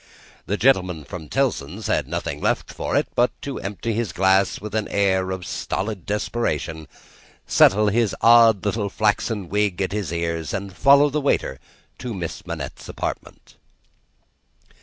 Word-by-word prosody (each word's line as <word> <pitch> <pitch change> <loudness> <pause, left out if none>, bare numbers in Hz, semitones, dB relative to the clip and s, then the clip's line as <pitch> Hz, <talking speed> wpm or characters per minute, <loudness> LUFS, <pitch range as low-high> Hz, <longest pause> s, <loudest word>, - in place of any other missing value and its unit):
The 100 - -1
gentleman 95 - +2
from 80 +1 -9
Tellson's 110 - -1
had - - 0
nothing - - -4
left - - -1
for - - -3
it - - +1
but 120 +1 +1
to 140 -2 -4
empty 105 +3 -3
his 110 -5 -2
glass 95 +1 +2
with 105 0 -8
an 110 -1 -1
air 95 -2 +1
of 95 -1 -4
stolid 100 -1 -4
desperation, 85 -7 -2 0.6
settle 105 +2 +5
his 110 0 +1
odd 115 -3 +6
little 105 0 -1
flaxen 105 -1 0
wig 105 -1 0
at 95 -1 -1
the 100 -6 -3
ears, 85 -1 -2
and 100 -1 -5
follow 140 +9 +5
the 150 +1 -1
waiter 70 - 0 0.4
to 120 -4 -5
Miss 85 -4 -6
Manette's - - -6
apartment. - - -6
100 Hz, 150 wpm, -22 LUFS, 90-115 Hz, 0.6 s, odd